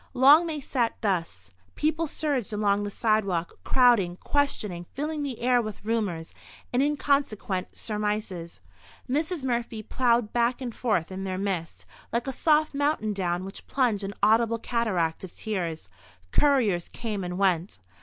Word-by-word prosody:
Long 290 +7 +7
they 310 -2 -3
sat 250 -4 -1
thus. 165 - -2 0.2
People 315 +2 0
surged 280 -7 -2
along 205 -1 +1
the 205 - -2
sidewalk, 200 -6 0
crowding, 235 -9 +4
questioning, 210 -13 -1
filling 300 +2 -2
the 270 -5 -4
air 245 0 +4
with 215 -2 -7
rumours, 205 -8 -2 0.4
and 250 - +3
inconsequent 275 -9 0
surmises. 210 -5 -3 0.5
Mrs. 305 +4 -1
Murphy 235 -3 -2
ploughed 235 -2 +1
back 240 +1 +2
and 250 -3 -5
forth 205 -9 0
in 190 +1 -5
their 185 -1 -3
midst, 165 - -3 0.3
like 235 +1 0
a 270 - -2
soft 305 +3 +2
mountain 285 -7 0
down 180 -2 -1
which 195 - -9
plunged 240 -7 +1
an 200 +1 -5
audible 230 +2 +4
cataract 210 -10 -1
of 185 - -9
tears. 175 -7 -3 0.4
Couriers 235 -12 +3
came 215 -4 -4
and 180 0 -4
went. 185 -2 +1
220 Hz, 145 wpm, -27 LUFS, 190-260 Hz, 0.5 s, Long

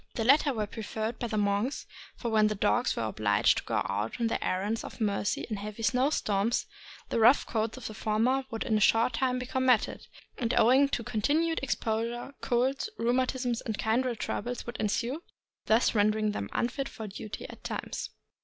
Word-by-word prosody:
The 225 - -1
latter 280 +4 +5
were 220 -4 -1
preferred 220 +2 -4
by 240 - -2
the 215 - -2
monks, 205 +5 0 0.3
for 235 - -4
when 215 -1 +4
the 210 - -1
dogs 240 +5 +1
were - - -2
obliged 110 -2 +2
to - - -10
go - - 0
out 105 - -3
on 235 - +1
their 225 - -1
errands 205 +5 -1
of - - -9
mercy 205 -2 0
in 215 -3 -3
heavy 210 +2 -6
snow 250 +6 +3
storms, 210 -4 0 0.4
the - - 0
rough 235 +5 +6
coats 220 +1 -2
of 255 - -9
the 215 - -5
former 225 +6 +1
would 225 -1 -3
in 220 - 0
a - - +3
short 225 +3 +4
time 255 +1 +1
become 255 +1 -2
matted, 250 -4 +2 0.3
and 240 -1 0
owing 265 +4 +5
to 240 - -2
continued 290 +9 +1
exposure, 235 0 -2
colds, 260 - 0
rheumatism, 250 +1 +1
and 220 -2 -2
kindred 240 +2 0
troubles 245 +3 -3
would 240 - -6
ensue, 235 +8 -1 0.5
thus 220 +3 +4
rendering 215 0 +2
them - - -4
unfit 270 +3 -1
for 220 - -7
duty 210 +1 -7
at - - -12
times. - - -4
230 Hz, 190 wpm, -29 LUFS, 215-250 Hz, 0.5 s, rough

